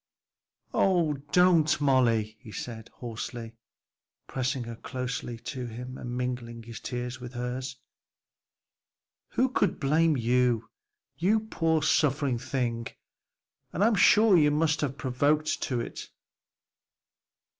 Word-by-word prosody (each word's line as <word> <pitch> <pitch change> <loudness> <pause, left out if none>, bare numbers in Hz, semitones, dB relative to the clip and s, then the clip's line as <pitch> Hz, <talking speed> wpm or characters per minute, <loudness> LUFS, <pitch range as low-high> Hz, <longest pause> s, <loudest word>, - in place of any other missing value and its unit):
"Oh, 175 -5 +3 0.2
don't, 175 -5 +4
Molly!" 120 -6 +2
he 115 -4 -12
said 110 0 -7
hoarsely, 115 -1 -6 0.7
pressing 130 0 -2
her 115 0 -7
closer 125 -1 -4
to 125 +2 -6
him 125 +3 -7
and 120 -1 -5
mingling 120 -2 -4
his 115 0 -8
tears 125 0 -4
with 125 0 -8
hers, 125 +2 -4 1.6
"who 255 - +3
could 200 -7 0
blame 155 +2 +3
you, 120 -1 +1 0.5
you 210 +6 +2
poor 165 -7 0
suffering 140 -5 +2
thing! 120 -2 -2 0.9
and 185 - +1
I'm 225 +2 +4
sure 210 +1 +6
you 150 -3 +5
must 155 +1 +1
have 140 -3 -1
been - - -25
provoked 145 +4 +1
to 125 -4 -1
it. - - -7
130 Hz, 120 wpm, -28 LUFS, 120-155 Hz, 1.6 s, sure